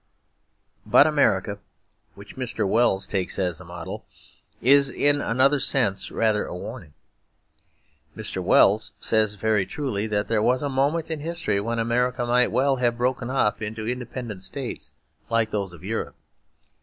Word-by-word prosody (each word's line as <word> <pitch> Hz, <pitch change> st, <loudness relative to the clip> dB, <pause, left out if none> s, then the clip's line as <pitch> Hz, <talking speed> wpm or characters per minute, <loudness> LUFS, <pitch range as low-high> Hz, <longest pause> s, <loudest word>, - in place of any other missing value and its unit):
But -, -, +6 dB
America, -, -, +1 dB, 0.6 s
which -, -, -13 dB
Mr. -, -, -2 dB
Wells 100 Hz, -2 st, +2 dB
takes 95 Hz, -2 st, -1 dB
as 90 Hz, -3 st, -1 dB
a -, -, -12 dB
model, 85 Hz, -1 st, -7 dB, 0.6 s
is 140 Hz, +2 st, +5 dB
in 145 Hz, +2 st, +3 dB
another 135 Hz, +5 st, +2 dB
sense 125 Hz, -9 st, +1 dB
rather 110 Hz, -2 st, +1 dB
a -, -, -7 dB
warning. 75 Hz, -3 st, -9 dB, 1.2 s
Mr. -, -, -4 dB
Wells 110 Hz, +2 st, +4 dB
says 110 Hz, -2 st, +1 dB
very 105 Hz, 0 st, +1 dB
truly 130 Hz, -8 st, -3 dB
that 105 Hz, -1 st, -1 dB
there 110 Hz, -2 st, +1 dB
was 125 Hz, +5 st, +2 dB
a 145 Hz, -, -1 dB
moment 145 Hz, +5 st, 0 dB
in 160 Hz, -, -3 dB
history 155 Hz, -10 st, -1 dB
when 115 Hz, +3 st, -3 dB
America 120 Hz, +2 st, 0 dB
might 125 Hz, +1 st, +2 dB
well 135 Hz, +1 st, +2 dB
have 120 Hz, -1 st, 0 dB
broken 125 Hz, 0 st, -1 dB
up 130 Hz, -6 st, +1 dB
into 110 Hz, +1 st, -4 dB
independent 120 Hz, -4 st, -5 dB
states 125 Hz, +6 st, -6 dB, 0.4 s
like 115 Hz, -1 st, +1 dB
those 100 Hz, -3 st, -2 dB
of 85 Hz, 0 st, -14 dB
Europe. 110 Hz, +4 st, -4 dB
115 Hz, 150 wpm, -24 LUFS, 105-130 Hz, 1.2 s, But